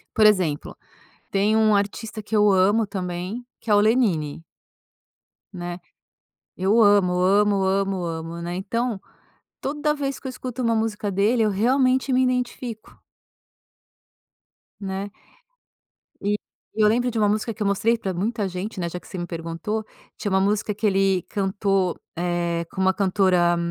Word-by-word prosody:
Por 215 - +6
exemplo: 180 -8 +1 0.6
tem 205 +2 +2
um 220 -1 +4
artista 215 +2 -2
que 215 +1 -4
eu 210 -1 +5
amo 200 +4 +3
também 185 +4 -4
que 230 - -10
é - - +6
o - - +6
Lenine. 205 - +1 1.1
Né, 175 -1 -6 0.8
eu 200 +5 +3
amo, 205 -4 +5
amo, 200 +2 +3
amo, 195 -1 0
amo, 165 0 -5
né. 175 +1 -4
Então, 220 +3 -2 0.6
toda 300 +2 -1
vez 275 -2 -3
que - - -10
eu - - -2
escuto 255 0 -5
uma 230 -1 +2
música 220 -2 -1
dele 210 +5 +2
eu 215 - +2
realmente 255 +5 +2
me 255 - +4
identifico. 250 -2 -3 1.8
Né. 195 0 -4 1.1
E 205 +1 0 0.4
eu 215 -1 +4
lembro 245 +3 +2
de 230 - -2
uma 210 -1 +3
música 215 +2 -1
que 215 - -5
eu - - 0
mostrei 215 +4 +2
pra 195 -5 -3
muita 205 +3 -1
gente, 185 +3 -5
né, 170 - -1
já 180 - -5
que - - -18
você - - -8
me 175 - -3
perguntou, 170 +6 -4 0.3
tinha 205 - -3
uma 190 0 +3
música 205 +1 0
que 210 +1 -1
ele 195 -2 +2
cantou, 195 -2 0 0.2
eh, 170 -1 -1
com 190 - -6
uma 190 0 +4
cantora, 185 -3 +3
200 Hz, 155 wpm, -23 LUFS, 185-220 Hz, 1.8 s, Por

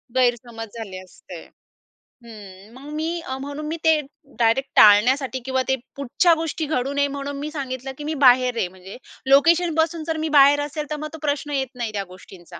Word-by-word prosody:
गैरसमज 240 -2 0
झाले 195 -4 -7
असते. 185 - -12 0.8
हं 205 -2 -13
मग 270 +4 -12
मी 330 +2 -3 0.2
म्हणून 285 +2 -6
मी 325 +2 -3
ते 320 -1 +4 0.4
डायरेक्ट 240 +4 +2
टाळण्यासाठी 255 +6 +5
किंवा 260 0 0
ते 265 - +2 0.2
पुढच्या 280 +6 +2
गोष्टी 320 -1 -3
घडू 275 -2 -2
नये 285 0 +1
म्हणून 280 0 -5
मी 300 +2 -4
सांगितलं 265 -3 -5
की 295 - -8
मी 310 - -3
बाहेर 250 -1 +5
आहे 190 - 0
म्हणजे 185 +2 -12 0.3
लोकेशनपासून 325 +2 +3
जर 325 -1 -1
मी - - -2
बाहेर 280 +1 +6
असेल 295 +1 -4
तर 305 - -2
मग 305 +1 -5
तो - - -7
प्रश्न 290 0 -2
येत 270 -2 -1
नाही 240 -3 -4
त्या 200 - -2
गोष्टींचा. 180 -1 -14
275 Hz, 180 wpm, -22 LUFS, 235-300 Hz, 0.8 s, बाहेर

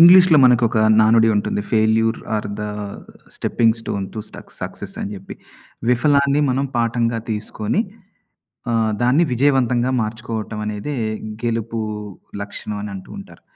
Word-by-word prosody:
ఇంగ్లీష్‌లో 175 -1 +8
మనకు 125 -1 +5
ఒక 110 - 0 0.2
నానుడి 110 +1 +5
ఉంటుంది, 105 0 -1
failure 110 +1 +3 0.2
are 105 0 -1
the - - -2 0.7
stepping 115 -1 +2
stone 100 -3 -3
to - - -5
suck - - -12
success - - -7
అని 100 - -3
జెప్పి. 95 -1 -9 0.5
విఫలాన్ని 140 +3 +3
మనం 135 +2 0
పాఠంగా 115 0 +1
తీసుకొని 105 - -2 0.9
ఆహ్, 115 -1 +2
దాన్ని 125 +7 +4
విజయవంతంగా 125 -1 +2
మార్చుకోవటం 110 0 -4
అనేదే 105 +7 -4 0.5
గెలుపు 115 -1 -2 0.6
లక్షణం 105 +1 -5
అని 105 - -5
అంటూ 95 - -9
ఉంటారు. - - -12
115 Hz, 130 wpm, -20 LUFS, 110-125 Hz, 0.9 s, ఇంగ్లీష్‌లో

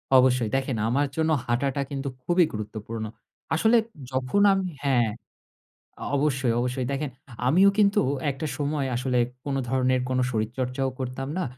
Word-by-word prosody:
অবশ্যই। 125 -3 +4
দেখেন 135 -2 -1
আমার 140 +5 +2
জন্য 160 0 +2
হাঁটাটা 135 +3 0
কিন্তু 140 0 -3 0.2
খুবই 175 0 +4
গুরুত্বপূর্ণ। 110 +1 -5 0.5
আসলে 220 +8 +4 0.3
যখন 130 +9 +1
আমি 190 -1 0 0.2
হ্যাঁ। 125 -5 +3 0.9
অ - - -4
অবশ্যই, 135 -4 +1
অবশ্যই। 125 +1 -1
দেখেন 140 +1 -2 0.4
আমিও 185 +9 +6
কিন্তু 200 -1 +4 0.3
একটা 140 +4 -5
সময় 145 -1 -1
আসলে 125 0 +1 0.3
কোনো 140 -1 -1
ধরনের 130 0 +2
কোনো 130 0 +1
শরীরচর্চা 125 +4 -2
ও - - -9
করতাম 130 +1 -4
না 185 - 0
130 Hz, 145 wpm, -26 LUFS, 125-145 Hz, 0.9 s, আমিও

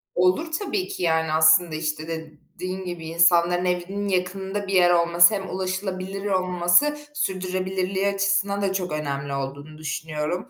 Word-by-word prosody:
Olur 185 - +2
tabii 375 +2 -2
ki. 180 - -6
Yani 160 -1 +1
aslında 160 +1 +5
işte 155 0 -3
dediğin 165 +4 -7
gibi 175 -2 -6
insanların 170 +2 +3
evinin 180 +3 -2
yakınında 190 +2 -2
bir 195 - -3
yer 180 -2 +5
olması 170 +2 +5
hem 195 -2 -5
ulaşılabilir 190 +1 -4
olması 185 +8 +2 0.2
sürdürülebilirliği 185 -3 -2
açısından 200 0 0
da 195 -1 0
çok 180 -3 -3
önemli 140 -2 -3
olduğunu 140 +3 -6
düşünüyorum. 155 - -4
180 Hz, 135 wpm, -24 LUFS, 160-195 Hz, 0.2 s, aslında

